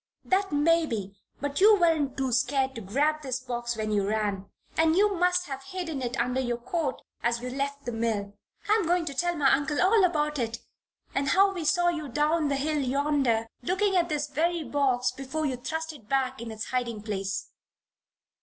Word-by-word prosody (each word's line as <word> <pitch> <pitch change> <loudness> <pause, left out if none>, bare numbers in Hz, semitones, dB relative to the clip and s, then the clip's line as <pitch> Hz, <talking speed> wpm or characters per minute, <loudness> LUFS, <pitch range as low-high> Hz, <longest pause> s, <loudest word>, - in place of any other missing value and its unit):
"That 385 0 +1
may 325 +3 +3
be. 200 -6 -4 0.3
But 285 +3 -2
you 420 0 +7
weren't 315 -6 +2
too 265 -2 0
scared 265 +2 +1
to 230 - -7
grab 290 +10 +1
this 260 -3 -2
box 240 -2 -3
when 215 -1 -2
you 200 -2 +1
ran. 205 -2 -1 0.3
And 320 0 +3
you 410 +2 +4
must 360 0 +2
have 270 -3 -6
hidden 325 -2 -5
it 245 0 -3
under 250 +2 0
your 240 -2 -1
coat 275 +2 -3 0.2
as 235 0 +1
you 250 +1 -5
left 280 +1 -3
the 240 - -2
mill. 220 -3 -2 0.3
I 420 - +4
am 395 -7 -1
going 350 0 +2
to 285 - -4
tell 350 +5 0
my 280 -4 +4
uncle 290 +1 0
all 410 +3 +5
about 300 -4 +1
it 230 -1 -2 0.6
and 275 0 0
how 390 +5 +4
we 355 -3 -4
saw 350 +2 +3
you 315 -4 -3
down 300 +4 +1
the 280 - 0
hill 300 +2 0
yonder, 270 -4 +1 0.2
looking 380 +8 +1
at 345 -1 +2
this 295 -1 0
very 325 +4 0
box 260 -2 +1
before 270 +4 -4
you 265 -3 0
thrust 320 +5 -4
it 230 -8 -16
back 265 -2 0
in 235 - -6
its 220 0 -6
hiding 240 -4 -2
place." 195 -2 -3
280 Hz, 200 wpm, -27 LUFS, 240-325 Hz, 0.6 s, you